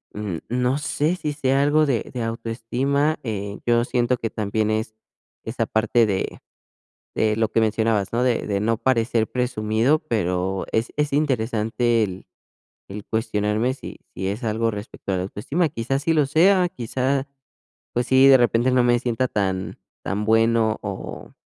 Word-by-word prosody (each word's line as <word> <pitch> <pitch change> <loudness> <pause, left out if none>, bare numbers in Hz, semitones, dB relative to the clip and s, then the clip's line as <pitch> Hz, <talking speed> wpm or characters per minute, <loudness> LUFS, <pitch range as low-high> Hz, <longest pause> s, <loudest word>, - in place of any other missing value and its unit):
mm, 105 -5 -3
no 125 +3 0
sé 150 +3 0
si 150 -4 -3
sea 135 -2 +1
algo 150 +2 +3
de 130 -6 -1
de 125 -2 -3
autoestima, 120 +7 -1
eh, 100 -4 -4
yo 120 0 +2
siento 120 0 +1
que 115 -1 -4
también 110 0 -1
es 110 0 -2 0.5
esa - - -2
parte 115 +1 +2
de 95 -2 -2 0.8
de 110 -1 +1
lo 110 0 +2
que 110 - +1
mencionabas, 110 -2 +1
¿no? 120 +2 +1
De 125 -4 0
de 100 -1 0
no 110 +2 0
parecer 115 -3 +1
presumido, 125 +3 +1
pero 95 - -1
es 110 +2 0
es 150 -1 0
interesante 120 -4 +1
el, 95 -3 -4 0.6
el 100 +2 -7
cuestionarme 110 +1 0
si 135 - -9 0.2
si 95 - -3
es 105 +6 -4
algo 115 +1 0
respecto 105 -1 -6
a - - 0
la 90 - -1
autoestima, 140 - -1
quizás 135 +2 -2
sí 165 - +2
lo 150 -3 +3
sea, 180 +5 +4
quizás, 135 -3 -2 0.7
pues 120 0 -1
sí, 130 +1 +6
de 135 - +9
repente 120 0 +2
no 125 -1 +3
me 120 0 +3
sienta 125 0 0
tan 95 -5 -2 0.3
tan 100 +3 -2
bueno 115 0 +3
o 100 -3 -7
115 Hz, 165 wpm, -23 LUFS, 110-130 Hz, 0.8 s, de